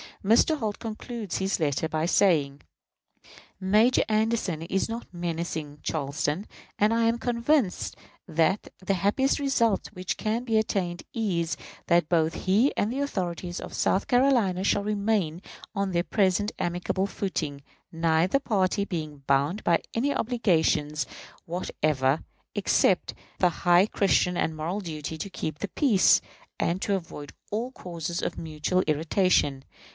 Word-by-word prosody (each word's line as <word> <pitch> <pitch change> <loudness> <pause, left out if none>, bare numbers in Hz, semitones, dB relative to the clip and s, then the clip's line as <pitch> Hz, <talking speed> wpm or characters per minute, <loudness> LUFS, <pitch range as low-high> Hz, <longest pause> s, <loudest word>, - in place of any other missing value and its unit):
Mr. 235 +9 +4
Holt 215 -4 -2
concludes 225 -2 -5
his 190 0 0
letter 155 0 0
by 155 0 -1
saying: 145 -8 +2 1.0
Major 215 +6 +4
Anderson 215 -6 0
is 190 +3 -1
not 230 +1 -6
menacing 165 -4 -4
Charleston; 150 +5 -2 0.3
and 210 +2 +4
I 230 0 +2
am 230 +1 +2
convinced 240 -3 +1 0.3
that 165 +4 +1
the 190 +1 0
happiest 205 +11 +1
result 235 -7 +1
which 185 -2 -3
can 225 +2 -1
be 225 -3 +1
attained 185 -5 -1
is, 175 -7 -1 0.3
that 170 -3 +3
both 160 -2 +2
he 210 +9 +3
and 210 - 0
the 265 - -3
authorities 180 - -3
of - - -8
South 190 - +1
Carolina 245 -8 +3
shall 200 +1 +2
remain 200 -5 0 0.3
on 200 -1 0
their 170 -1 +1
present 200 +1 +1
amicable 180 +2 -1
footing, 155 -9 -3 0.3
neither 165 +7 +2
party 200 -5 +1
being 155 -6 -5
bound 140 +9 +1
by 170 -1 +3
any 275 +5 +1
obligations 160 - +1 0.4
whatever, 155 -5 0 0.3
except - - +2 0.3
the 180 - +5
high 175 +2 +4
Christian 185 -4 +2
and 160 - 0
moral 170 +7 -3
duty 160 -3 -5
to 200 - -5
keep 155 -4 -5
the 205 - -2
peace, 235 -11 +4 0.4
and 170 +2 0
to 200 - +1
avoid 155 -5 -7 0.2
all 230 +5 -2
causes 170 - -5
of - - -3
mutual 160 +3 -1
irritation. 155 -3 +2
185 Hz, 140 wpm, -27 LUFS, 160-215 Hz, 1.0 s, the